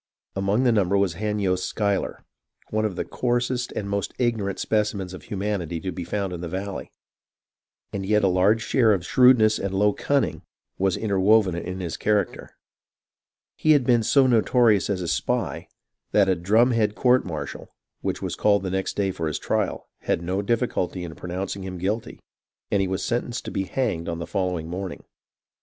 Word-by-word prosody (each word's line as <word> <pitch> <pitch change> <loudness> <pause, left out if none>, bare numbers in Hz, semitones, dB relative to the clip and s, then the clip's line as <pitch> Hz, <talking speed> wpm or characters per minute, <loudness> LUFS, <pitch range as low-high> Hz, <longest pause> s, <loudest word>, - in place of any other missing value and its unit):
Among 100 +5 +1
the 125 - +4
num 100 -5 +2
ber 100 - +3
was 100 -3 +2
Hanyost 100 -1 -1
Schuyler, 100 -2 -1 0.5
one 110 0 +1
of 100 -4 -2
the - - -3
coarsest 125 0 -1
and 100 - -3
most 100 -1 -2
ignorant 110 -6 0
specimens 105 -4 -1
of 95 - -8
humanity 95 -5 -3
to 95 +2 -4
be 90 +1 -5
found 100 +1 -3
in 85 - -6
the 90 - -4
valley; 95 +2 -5 1.0
and 100 - -3
yet 105 +2 +2
a - - +5
large 95 +5 +3
share 115 -3 +3
of 90 -3 -2
shrewdness 120 -3 +5
and 95 -1 -3
low 105 +1 +3
cunning 135 - 0 0.4
[was] 95 -1 +1
interwoven 100 -1 +3
in 90 +2 -4
his 85 -2 -4
character. 105 -3 0 1.1
He 155 - +4
had 145 -3 +4
been 120 -1 +3
so 135 +5 +4
notorious 115 -3 +3
as 95 -3 -1
a - - -4
spy, 80 - -1 0.5
that 100 -2 +5
a 95 - +3
drumhead 110 +4 +2
court 125 0 +4
martial, 80 -4 -6 0.3
which - - -3
was - - -2
called 100 -1 +2
the 95 - -3
next 95 0 -2
day 100 -2 0
for 80 -3 -3
his 75 - -2
trial, - - -2
had 85 - -1
no 95 +3 -1
difficulty 100 -5 -1
in 85 -2 -6
pronouncing 95 +3 -5
him 95 -1 -6
guilty, 105 +6 -3 0.5
and 100 - +3
he 95 - +1
was 95 +1 -2
sentenced 120 0 -2
to - - -5
be 95 - -1
hanged 100 -7 -2
on 85 - -3
the 85 - -4
follow 90 0 -1
ing 80 0 -6
morning. 90 +1 -5
100 Hz, 185 wpm, -24 LUFS, 90-110 Hz, 1.1 s, a